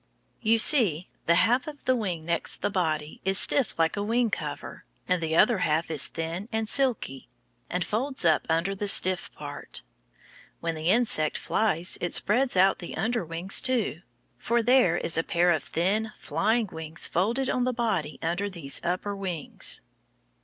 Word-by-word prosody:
You 225 +1 +3
see, 215 - +4 0.2
the 170 - +5
half 245 - +2
of 295 -1 -9
the 255 - +3
wing 185 -8 -2
next 170 0 -2
the - - 0
body 155 -5 -2
is 190 0 +1
stiff 260 -1 +1
like 165 -1 +1
a 205 - -2
wing 230 +2 +1
cover, - - -5 0.2
and 180 -2 +1
the 160 0 -1
other 215 +3 +4
half 160 0 0
is 150 -4 +3
thin 170 +6 -5
and 220 -1 -1
silky, 235 - -1 0.4
and 180 0 -1
folds 260 +1 -1
up 160 -2 +3
under 165 +4 +1
the 205 +1 -4
stiff 185 -2 +3
part. - - -7 0.8
When 165 0 -2
the 160 0 -4
insect 195 -9 +2
flies 185 -5 0
it 175 - -2
spreads 245 +1 +2
out 190 +1 +4
the 175 - -7
under 230 0 -1
wings, 170 +3 +1
too, 235 - -1 0.4
for 235 - 0
there 245 -9 +4
is 165 -1 0
a - - 0
pair 175 +1 +2
of 160 - +1
thin, 210 +6 -1
flying 225 +2 0
wings 160 +1 -3
folded 230 +9 0
on 250 -1 0
the 255 - +1
body 210 - -2
under 175 +5 -1
these 165 -7 -3
upper 185 +4 -2
wings. 185 -6 -2
190 Hz, 175 wpm, -26 LUFS, 165-225 Hz, 0.8 s, the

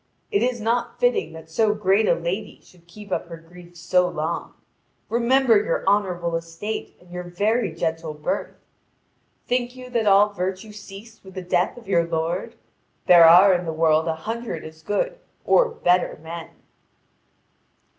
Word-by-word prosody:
It 405 - +2
is 245 -1 0
not 230 +2 -1
fitting 245 -10 +1
that 160 0 -11
so 210 +6 +1
great 205 +1 +2
a - - +4
lady 180 +5 -4
should 170 -2 -22
keep 205 +3 -13
up - - -2
her 165 -1 -8
grief 175 +1 -16
so 180 +2 +2
long. 155 +2 -4 0.5
Remember 240 0 +3
your - - -2
honourable 180 -4 +1
estate 165 +6 -5
and 180 0 -20
your 180 0 -5
very 205 +4 -1
gentle 160 -1 -3
birth! 150 0 -3 0.9
Think 245 0 -1
you 255 -1 -11
that 230 -3 0
all 205 +1 +5
virtue 190 +3 -4
ceased 210 +2 -12
with 190 -1 -14
the 185 - -5
death 180 +4 0
of 235 - -13
your 170 -3 +3
lord? 165 +2 -3 0.5
There 175 -2 +8
are 180 +4 +8
in 180 0 0
the - - -1
world 160 0 +2
a 160 - 0
hundred 225 +1 -5
as 160 0 -12
good - - -2 0.3
or - - +4
better 180 - +1
men." 165 0 -7
185 Hz, 165 wpm, -23 LUFS, 165-220 Hz, 0.9 s, There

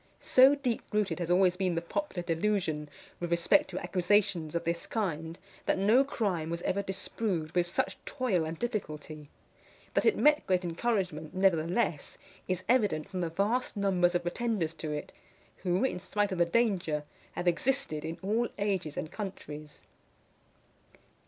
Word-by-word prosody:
So 265 +2 +6
deep 255 -5 -1
rooted 210 -3 0
has 175 -1 -3
always 180 0 +4
been 185 -2 0
the 165 - 0
popular 190 - -3
delusion 165 -3 0 0.3
with 175 - -3
respect 170 +2 +3
to 185 - -5
accusations 180 -2 +1
of 170 - 0
this 170 0 -2
kind, 165 -6 -2 0.3
that - - +3
no 215 +7 +5
crime 195 - -1
was 170 +1 -4
ever 200 - 0
disproved 190 -3 -3
with 175 -1 +1
such 190 +2 -1
toil 235 - 0
and 160 +1 -4
difficulty. 155 - -4 0.6
That - - +2
it 445 - +4
met 300 0 +4
great 185 -1 +2
encouragement, 175 -4 -2
nevertheless, 175 -2 +1 0.3
is 185 -1 -1
evident 205 -11 +2
from 185 - -4
the 170 - -1
vast 210 +8 0
numbers 185 -3 +2
of 175 - +1
pretenders 175 -2 -1
to 155 - -3
it; 150 0 -4 0.5
who, 180 +2 0
in 260 -8 0
spite 205 +2 -1
of 185 - -2
the 175 - +5
danger, 175 -7 +1 0.3
have 175 - -3
existed 175 - +1
in 165 +1 -4
all 225 +5 +1
ages 195 -7 -1
and 155 - -4
countries. 155 -7 -7
180 Hz, 160 wpm, -30 LUFS, 165-210 Hz, 0.6 s, So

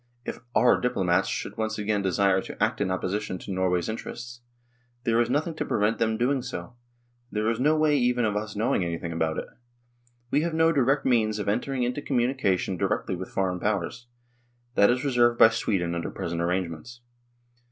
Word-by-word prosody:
If - - -5 0.2
"our" 125 - +4
diplomats 95 -8 +1
should - - -4
once 110 0 -2
again 105 -1 0
desire 95 0 +2
to - - -4
act - - 0
in 105 - +1
oppo 95 0 -2
sition 95 -1 -2
to - - -7
Norway's 90 -2 0
interests, 120 +2 -6 0.6
there 115 0 +3
is 120 - 0
nothing 150 +5 0
to - - -1
prevent 105 +2 0
them 110 -1 +1
doing 130 +3 +1
so; 125 -1 -6 0.6
there 105 0 -1
is 115 - -3
no 150 +4 +3
way 155 -1 +3
even 125 -2 +2
of 105 -2 0
us 105 0 -3
knowing 105 -3 +1
anything 85 0 -3
about 80 -1 -1
it. - - -3 0.9
We 145 - +3
have 165 0 -2
no 160 0 +4
direct 135 -1 +2
means 110 -4 +2
of 105 - -4
entering 125 +5 0
into 125 +4 -1
communication 120 -9 0
directly 95 -1 -1
with 95 +1 -6
foreign 95 -2 -1
powers; 105 +4 -2 0.7
that 100 -3 +5
is 125 +3 +1
reserved 120 -3 +3
by 115 - +8
Sweden 95 -6 -1
under 85 0 -3
present 85 0 -4
arrangements. 90 +6 -3
110 Hz, 185 wpm, -26 LUFS, 95-125 Hz, 0.9 s, by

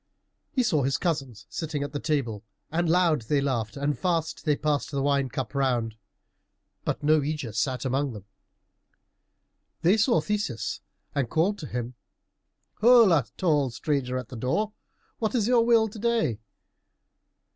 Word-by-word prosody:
He 260 -5 +1
saw 175 -11 +2
his 135 +1 +1
cousins 135 - -3
sitting 155 -3 -3
at 145 - -5
the 145 - -3
table, 125 -10 -1 0.3
and 170 +1 0
loud 170 -5 +3
they 140 +6 +1
laughed 130 -3 -1
and 140 +1 0
fast 165 +2 -1
they 150 -2 +3
passed 150 0 -1
the 140 - -2
wine 140 -2 +1
cup 130 0 -4
round, 125 -5 0 0.9
but - - -2
no 155 +1 +5
Ægeus 145 -6 -3
sat 130 +2 -1
among 135 +2 0
them. 105 -3 -10 1.6
They 185 +6 +5
saw 235 +3 +3
Theseus 130 - -2 0.3
and 135 -5 -1
called 190 +6 +1
to 150 - -6
him, 120 0 -4 0.9
"Holla, 215 - +6
tall 150 -7 +2
stranger 130 +1 -1
at 125 -3 -6
the 130 - -8
door, 205 - -1 0.5
what 220 +2 -1
is 225 -3 +2
your 240 -2 +4
will 230 -1 +4
to 215 - -10
day?" 225 - +1
145 Hz, 155 wpm, -26 LUFS, 130-180 Hz, 1.6 s, Holla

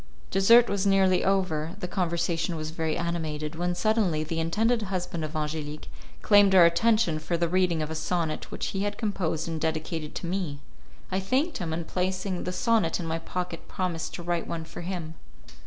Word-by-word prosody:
Dessert 230 +5 +6
was 200 0 0
nearly 190 -2 +4
over, 180 -5 0
the 180 - -3
conversation 170 -2 -1
was 155 0 -4
very 160 -1 -1
animated, 160 -3 -3
when 175 +2 -1
suddenly 185 -5 +1
the 165 +1 -3
intended 220 +8 +1
husband 180 -4 -3
of 155 +1 -5
Angelique 150 0 -4 0.3
claimed 205 -2 +6
our 180 -2 +9
attention 180 -1 +3
for 170 +2 -2
the 170 0 +1
reading 175 -2 +1
of 155 - -5
a - - -1
sonnet 160 0 -2
which - - -3
he 195 - -2
had 205 0 -2
composed 180 -7 -1
and 160 -2 -3
dedicated 160 -1 -2
to - - -4
me. 170 -5 -2 0.5
I 190 - +1
thanked 260 - 0
him, 170 -3 -3
and 165 +1 -3
placing 185 +1 -2
the 180 - -2
sonnet 190 -3 +1
in 175 - -4
my 165 0 -2
pocket 180 0 -5
promised 170 -4 -3
to 175 - -7
write 175 0 -1
one 165 -1 -4
for 165 +1 -8
him. 170 -3 -4
175 Hz, 190 wpm, -27 LUFS, 160-190 Hz, 0.5 s, our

